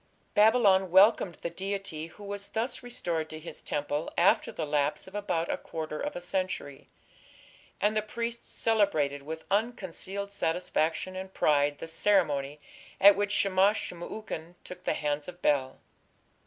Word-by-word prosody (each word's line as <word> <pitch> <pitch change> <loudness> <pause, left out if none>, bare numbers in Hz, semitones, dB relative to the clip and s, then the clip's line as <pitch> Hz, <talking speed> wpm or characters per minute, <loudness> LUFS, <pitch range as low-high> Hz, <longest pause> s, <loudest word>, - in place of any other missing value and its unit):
Babylon 210 -4 +5
welcomed 190 -1 +5
the 170 - -2
deity 190 -3 -4
who 205 +5 -14
was 200 0 -5
thus 230 +4 -2
restored 175 -11 -3
to 155 - -7
his 165 - -9
temple 145 +1 -2
after 180 +3 +4
the 160 - -3
lapse 145 -1 0
of 190 - -13
about 180 -5 -1
a - - -1
quarter 155 -1 -5
of - - -3
a 175 - -5
century, 180 -6 -3 0.9
and 210 +1 +2
the 215 - +2
priests 235 +2 -5
celebrated 160 -11 +1
with 160 +3 -7
unconcealed 200 -2 -2
satisfaction 175 0 -1
and 190 0 -7
pride 145 -1 +3
the 165 - -7
ceremony 155 -6 +1 0.4
at 200 +1 +9
which 205 0 -1
Shamash 195 +1 +3
shum 175 -1 -6
ukin 175 -4 -6
"took 180 0 -11
the - - +1
hands 145 0 -2
of 180 0 -9
Bel". 135 -3 +2
180 Hz, 155 wpm, -29 LUFS, 155-200 Hz, 0.9 s, at